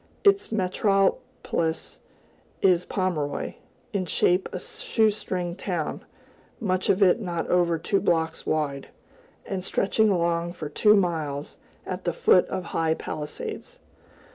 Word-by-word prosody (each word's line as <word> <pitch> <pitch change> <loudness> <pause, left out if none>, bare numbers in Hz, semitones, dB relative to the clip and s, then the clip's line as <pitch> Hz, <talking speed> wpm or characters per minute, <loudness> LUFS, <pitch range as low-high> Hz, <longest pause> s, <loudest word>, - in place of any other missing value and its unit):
Its 400 - +4
metropolis 195 - 0 0.6
is 180 -2 +3
Pomeroy, 165 -7 -2 0.4
in 190 -3 -1
shape 180 +3 +2
a - - -4
"shoe 225 - +1
string" 180 -4 -3
town, 175 -5 -3 0.6
much 185 -5 0
of 195 +1 +4
it 195 +5 +4
not 175 -4 -2
over 175 -2 +3
two 195 +5 0
blocks 160 -3 0
wide, 145 -3 -1 0.6
and 190 -2 -3
stretching 210 +3 +2
along 170 -2 0
for 155 -4 -6
two 210 +8 +5
miles, 160 -7 -1 0.3
at 185 0 -5
the 175 - +1
foot 180 - +4
of 185 - -3
high 165 -1 0
palisades. 150 -1 -6
180 Hz, 125 wpm, -26 LUFS, 165-195 Hz, 0.6 s, two